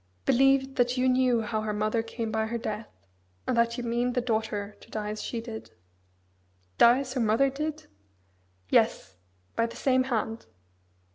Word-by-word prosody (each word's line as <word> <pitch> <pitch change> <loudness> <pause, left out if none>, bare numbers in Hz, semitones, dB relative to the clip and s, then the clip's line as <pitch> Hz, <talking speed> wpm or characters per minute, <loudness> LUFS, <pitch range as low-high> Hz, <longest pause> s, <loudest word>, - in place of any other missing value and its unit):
"Believe 270 +1 +3
that 245 +1 +2
you 255 +1 +2
knew 255 -2 +3
how 215 0 -2
her 215 -1 -2
mother 215 +2 0
came 225 0 -4
by 220 0 0
her 235 +1 -2
death; 215 -1 -4 0.6
and 255 - 0
that 235 0 +2
you 245 - -3
mean 240 +1 0
the 250 - +1
daughter 220 -4 -2
to - - -17
die 210 -1 -3
as 215 - -5
she 235 - -3
did." 225 -1 -8 1.1
"Die 240 +2 +7
as 260 -2 -6
her 260 - 0
mother 230 +5 +3
did?" 300 +2 -4 0.9
"Yes! 95 -1 +2 0.4
by 230 - +2
the 230 - -10
same 260 -1 +2
hand!" 225 -3 -2
235 Hz, 170 wpm, -28 LUFS, 220-255 Hz, 1.1 s, Die